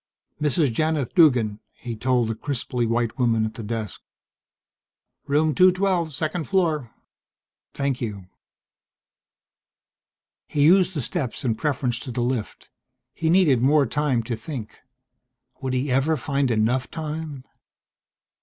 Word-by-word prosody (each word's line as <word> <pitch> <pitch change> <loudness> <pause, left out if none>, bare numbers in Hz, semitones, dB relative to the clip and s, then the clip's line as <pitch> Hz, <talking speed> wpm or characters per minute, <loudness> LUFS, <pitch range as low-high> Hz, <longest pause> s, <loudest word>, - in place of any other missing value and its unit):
"Mrs. 145 -3 +2
Janith 155 -1 0
Duggan," 125 - +4 0.2
he 120 -3 -6
told 120 +1 +1
the 115 - -1
crisply 125 -1 -2
white 115 +1 -1
woman 115 -3 +2
at 110 - -4
the - - -8
desk. 110 -2 -5 1.3
"Room 150 +2 +2
212, 185 -2 +3
second 155 +4 -2
floor." 160 -10 0 0.9
"Thank 140 -2 -1
you." 100 -5 -5 2.2
He 145 - +1
used 185 +3 +5
the 145 - -2
steps 135 -1 -3
in 120 - +2
preference 130 -2 -1
to 130 - -7
the 120 - -2
lift. 120 -3 -3 0.4
He 160 - -1
needed 165 -9 +4
more 140 +2 +4
time 135 -2 0
to 115 +1 -3
think 115 -1 -7 0.8
would 130 -1 -2
he 130 +2 -1
ever 140 +5 +2
find 140 -1 0
enough 120 +3 +1
time? 155 -3 -5
135 Hz, 125 wpm, -24 LUFS, 120-155 Hz, 2.2 s, used